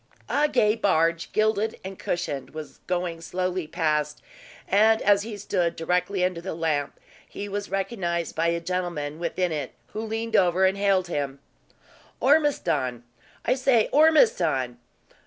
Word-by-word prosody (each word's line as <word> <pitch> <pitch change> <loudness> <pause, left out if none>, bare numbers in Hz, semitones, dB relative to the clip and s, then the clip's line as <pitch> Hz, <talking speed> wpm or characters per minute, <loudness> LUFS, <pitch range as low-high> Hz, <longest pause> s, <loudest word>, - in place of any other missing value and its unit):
A 295 +1 +2
gay 210 -5 +3
barge, 165 -5 +1
gilded 215 0 +1
and 190 0 -7
cushioned, 150 -6 -3
was 155 -1 -8
going 175 -2 -2
slowly 180 0 -2
past; 150 -2 -1 0.4
and 220 +3 +4
as 200 0 +4
he 215 0 -6
stood 185 -4 -1
directly 180 +3 0
under 180 -2 -2
the 190 -1 -5
lamp, 155 -4 -1 0.3
he 205 - -6
was 205 0 -4
recognized 185 -4 -2
by 165 +1 +1
a 170 0 +1
gentleman 170 -4 -3
within 175 +1 -1
it, 145 -4 -4 0.2
who 215 - -5
leaned 225 0 -3
over 185 -1 +4
and 190 +1 +2
hailed 195 -2 +2
him, 140 -4 -3 0.8
"Ormiston! 180 - +2 0.4
I 250 - +3
say, 255 -4 +2
Ormiston!" 305 - +3
180 Hz, 140 wpm, -25 LUFS, 165-210 Hz, 0.8 s, and